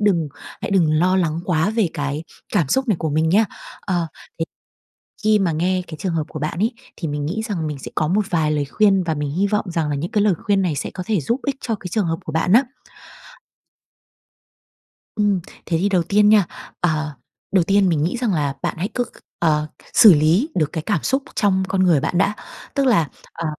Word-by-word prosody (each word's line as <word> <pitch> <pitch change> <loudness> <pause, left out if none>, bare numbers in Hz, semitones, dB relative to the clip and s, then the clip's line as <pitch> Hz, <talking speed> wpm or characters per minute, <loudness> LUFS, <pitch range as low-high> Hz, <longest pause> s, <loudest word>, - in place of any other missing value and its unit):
đừng 180 -7 +2 0.3
hãy - - -3
đừng 175 -6 +3
lo 180 +4 +3
lắng 165 -3 0
quá 175 +1 +1
về 220 -4 +1
cái 145 +2 -3 0.3
cảm 170 -10 +2
xúc 265 - +1
này 210 - +3
của 160 - -2
mình 155 +2 +2
nha. 205 +7 +4 0.4
Ờ, 175 -4 -1 0.3
thế 165 - 0 0.8
khi 215 0 +4
mà 190 -4 +1
nghe 180 +4 0
cái 155 - -8
trường 185 -3 -2
hợp 160 -2 0
của 155 - -6
bạn 155 +3 -3
ấy, 225 +5 +1 0.2
thì 165 - -4
mình 145 -1 -3
nghĩ 185 +9 -2
rằng 165 -6 -2
mình 150 -2 -4
sẽ - - -8
có 155 - +1
một 200 +5 +1
vài 160 -3 +1
lời 150 -1 0
khuyên 195 +5 +3
và 165 -2 -1
mình 145 -2 -3
hy 190 +6 +1
vọng 210 +1 0
rằng 165 -3 -1
là 145 - -1
những 155 +5 -4
cái 210 - +2
lời 210 -2 +4
khuyên 205 -3 +2
này 175 -5 0
sẽ 140 - -3
có 185 - -5
thể 210 -2 +1
giúp 230 - -1
ích 280 -2 0
cho 225 - -1
cái 190 - -8
trường 210 -1 +1
hợp 165 0 -1
của 155 - -4
bạn 160 +4 +1
á. 245 +5 +7 2.5
Ừm, 205 -3 +2 0.3
thế 165 - 0
thì 200 - +2
đầu 185 -4 +2
tiên 205 +4 +4
nha, 210 -3 +6 0.3
ờ, 155 -3 0 0.4
đầu 190 -3 +4
tiên 195 +1 +3
mình 155 -4 +1
nghĩ 175 +9 -1
rằng 235 -5 0
là 145 -4 0
bạn - - -2
hãy 180 +5 -1
cứ 245 - 0
c - - -11 0.3
ờ, 155 -2 +2 0.3
xử 215 -5 +9
lý 165 - +3
được 155 -4 +1
cái 160 - -2
cảm 165 - -1
xúc 270 +1 0
trong 190 -3 +2
con 190 0 +1
người 170 -6 +4
bạn 175 - -1
đã. 200 +3 +2 0.4
Tức 275 -1 +1
là, 205 - +3 0.3
ờ, 170 - -5
180 Hz, 230 wpm, -21 LUFS, 155-205 Hz, 2.5 s, xử